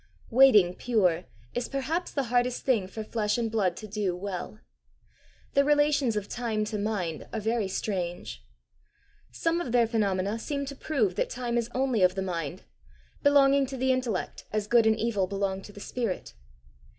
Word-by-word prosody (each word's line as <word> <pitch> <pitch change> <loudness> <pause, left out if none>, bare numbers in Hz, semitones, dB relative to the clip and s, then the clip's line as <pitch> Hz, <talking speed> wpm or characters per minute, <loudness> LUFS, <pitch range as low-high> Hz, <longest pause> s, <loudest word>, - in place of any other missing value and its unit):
Waiting 225 -8 +6
pure 185 -7 +1 0.3
is 245 - -2
perhaps 300 +6 -2
the 280 - -1
hardest 245 0 +1
thing 225 -8 +2
for 220 +3 -6
flesh 215 0 -1
and 230 -2 -1
blood 190 -6 +1
to 215 - -7
do 200 -3 -1
well. 195 +2 -5 0.9
The 280 - +5
relations 290 -4 +3
of 205 -1 -2
time 225 -3 -2
to 210 0 -3
mind 195 -7 -2
are 225 - -2
very 220 -1 0
strange. 175 - -4 0.9
Some 330 - 0
of 250 - -4
their 240 -1 +4
phenomena 205 -2 0
seem 280 +3 -3
to 280 +1 -7
prove 255 - 0
that - - 0
time 245 -1 -3
is 235 -1 0
only 260 -4 +1
of 185 0 +4
the 190 - -1
mind 170 -6 -4 0.6
belonging 280 -1 +5
to 265 0 -6
the 260 +1 +2
intellect 250 -7 -2
as 215 -1 -1
good 230 +1 +4
and 220 0 +3
evil 215 -4 0
belong 195 0 -2
to 205 - -11
the 205 - -12
spirit. 225 -2 -4
220 Hz, 175 wpm, -28 LUFS, 195-255 Hz, 0.9 s, Waiting